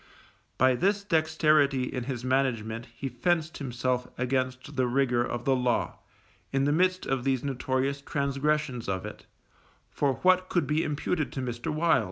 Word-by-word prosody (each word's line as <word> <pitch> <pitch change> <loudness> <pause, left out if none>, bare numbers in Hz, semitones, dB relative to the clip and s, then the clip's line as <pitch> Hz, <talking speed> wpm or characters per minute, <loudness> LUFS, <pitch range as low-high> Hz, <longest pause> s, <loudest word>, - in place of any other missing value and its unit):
By 130 +1 +5
this 200 +9 +1
dexterity 155 -6 +3
in 125 -1 -3
his 130 -2 -4
management 120 -3 0
he 115 +4 -5
fenced 160 +5 -1
himself 125 -2 -1
against 130 +2 -2
the 130 -1 +2
rigour 125 -1 +2
of 120 0 -4
the 135 - +3
law, 125 -1 0 0.5
in 135 0 +1
the 145 - +2
midst 185 +4 +2
of 135 -2 -1
these 135 -2 0
notorious 135 0 -1
transgressions 140 -3 -1
of 95 0 -2
it, 105 - -9 0.6
for 140 -2 +1
what 185 0 +4
could 175 - +1
be 155 +2 +1
imputed 150 +1 -1
to - - -4
Mr. 120 0 -3
Wild? 160 +2 +3
135 Hz, 160 wpm, -28 LUFS, 125-155 Hz, 0.6 s, By